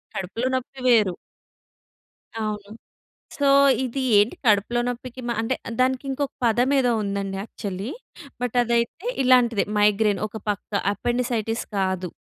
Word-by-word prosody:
కడుపులో 210 +7 -3
నొప్పి 260 +1 -5
వేరు. 215 -6 +4 1.2
అవును. 210 -2 -4 0.7
సో, 285 - +2 0.4
ఇది 260 +1 -3 0.2
ఏంటి 205 +3 +3
కడుపులో 220 +2 +3
నొప్పికి 245 +1 -5
మ - - -2
అంటే 230 +3 -1 0.2
దానికి 255 +1 +2
ఇంకొక 270 +1 -2
పదం 240 +2 +3
ఏదో 250 -2 +2
ఉందండి 200 -1 -3
యాక్చువల్లీ. 200 0 -6 0.5
బట్ 245 -1 -2
అదైతే 235 - -1
ఇలాంటిదే 250 -4 +4
మైగ్రేన్ 210 -1 +3
ఒక 215 +1 -8
పక్క. 205 0 -3 0.2
అపెండిసైటిస్ 235 -1 -1
కాదు. 190 -2 -1
230 Hz, 125 wpm, -24 LUFS, 205-250 Hz, 1.2 s, వేరు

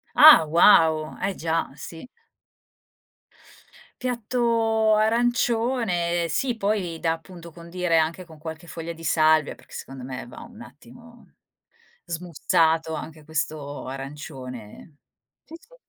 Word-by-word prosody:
Ah, 300 - +10
wow! 160 -2 +4
Eh 195 0 -1
già, 165 0 -2
sì! 165 - -10 2.0
Piatto 230 -3 +1
arancione, 225 -6 +1
sì, 240 +9 -1
poi 195 -6 -1
da, 165 0 0
appunto, 170 0 -10
condire 170 0 -1
anche 165 +3 -1
con 160 -2 -15
qualche 160 +2 -8
foglia 165 0 -6
di 165 0 -12
salvia, 155 -1 +3
perché - - -18
secondo 135 -1 -8
me 130 -1 -7
va 120 - -12
un 230 -1 -13
attimo 240 0 -16 0.7
smussato 165 -1 0
anche 155 -1 -7
questo 150 -2 -4
arancione. 135 -2 -9 0.5
Sì, 320 - -14
sì. - - -22
170 Hz, 115 wpm, -24 LUFS, 155-220 Hz, 2.0 s, Ah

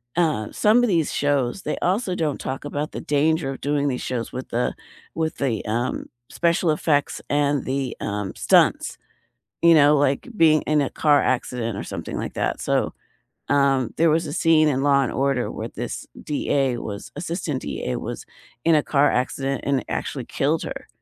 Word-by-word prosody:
uh, 155 -11 0
some 225 +4 +4
of - - +3
these 165 -5 +1
shows, 145 +3 0
they - - -2
also 185 +1 0
don't 155 -5 -1
talk 130 +2 -4
about 145 +1 -3
the - - -6
danger 150 0 +1
of 135 - -8
doing 145 0 0
these 125 -2 -2
shows 120 -3 -3
with 130 +1 -6
the 120 +1 -1 0.4
with 160 -1 -2
the, 120 -7 -1
um, 120 +4 -2 0.2
special 170 0 +1
effects 145 -2 0
and 145 -1 +1
the, 135 0 -2
um, 100 -2 -3
stunts, - - +3 0.7
you 170 0 +8
know, 150 0 +6
like 140 - +1
being 155 -2 +5
in 150 0 +2
a 135 - 0
car 145 -2 +3
accident 120 -3 -1
or - - -4
something - - -6
like - - -4
that. - - -1
So, - - 0 0.6
um, 135 -4 +2
there 165 0 +4
was 160 +1 +1
a 145 - -5
scene 160 -3 +4
in 135 -2 0
Law& 140 -2 +4
Order 135 -2 0
where - - -5
this - - -6 0.2
DA 135 -3 0
was 100 -3 -6
assistant 165 -3 -3
DA 65 - -3
was - - -6 0.4
in 165 - +6
a 150 - +4
car 145 0 +3
accident 135 +1 -1
and 140 -3 +1
actually - - -3
killed - - 0
her. - - -7
145 Hz, 180 wpm, -23 LUFS, 130-155 Hz, 0.7 s, you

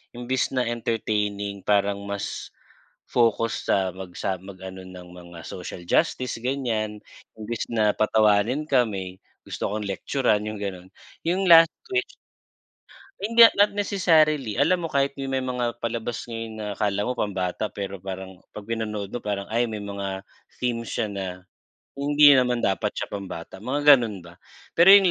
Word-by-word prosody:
imbes 125 +2 -1
na 125 - +2
entertaining 105 -3 -2
parang 100 -1 +1
mas 100 0 -5 0.6
focus 115 -1 +1
sa 95 -1 +2
mag 95 -1 -9
sa 95 -2 -2
mag-ano 95 -1 -9
ng 90 -1 -11
mga 85 -1 -12
social 90 -1 -7
justice 125 -2 +1
gan'yan 115 -5 -2 0.4
imbes 110 +1 -4
na 110 -2 +3
patawanin 110 +5 +2
ka 130 -3 +5
may 95 -2 -6 0.3
gusto - - -3
kong 105 0 -3
lektyuran 105 +3 0
yung 105 0 -4
gano'n, 95 -2 -5 0.4
yung 190 +3 +1
"Last 165 -1 +9 0.2
Wish." 380 0 -1 1.1
Hindi, 230 +2 +8
not 205 +1 +4
necessarily 155 - +2
alam 175 +5 +3
mo 165 - -2
kahit 140 -1 +1
may 135 -1 -2
mga 125 -2 -2
palabas 115 0 -4
ngayon 115 -1 -6
na 105 - -5
akala 100 0 -1
mo 125 - -1
pambata 95 0 -2
pero 100 -2 -6
parang 95 -1 -7
pag 105 -1 -10
pinanood 110 -3 -4
mo 120 - -4
parang 100 -1 -3
ay 120 -1 +1
may 110 - -4
mga 100 -1 -5 0.3
theme 120 -2 -1
siya 110 -1 -2
na 100 -2 -4 0.7
hindi 145 +1 +6
naman 125 -1 +1
dapat 95 - 0
siya - - -4
pambata 95 -3 -7
mga 145 +6 +5
gano'n 105 -6 -4
ba. 85 0 -15 0.4
Pero 185 +4 +9
yung 195 -3 +6
110 Hz, 155 wpm, -24 LUFS, 100-130 Hz, 1.1 s, Last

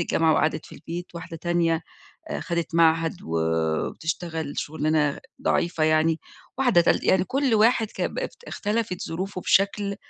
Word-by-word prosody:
الجامعة 165 -1 +2
وقعدت 155 0 0
في - - -12
البيت، 175 +2 -6
واحدة 170 -1 -7
تانية 170 -1 +1 0.5
آآ - - -2
خدِت 170 -2 -3
معهد 165 0 +3
وبتشتغل 85 - -2
شُغلانة 150 -1 0 0.2
ضعيفة 170 -8 +1
يعني، 155 +1 +3 0.4
واحدة 245 -9 +5
تالتة - - +2
يعني 185 -1 +4
كل 265 +1 +1
واحد 225 +1 +4
ك - - -5
بقت - - -5
اختلفت 210 -3 -2
ظروفه 185 +3 -4
بشكل 200 +1 +2
170 Hz, 135 wpm, -25 LUFS, 160-195 Hz, 0.5 s, واحدة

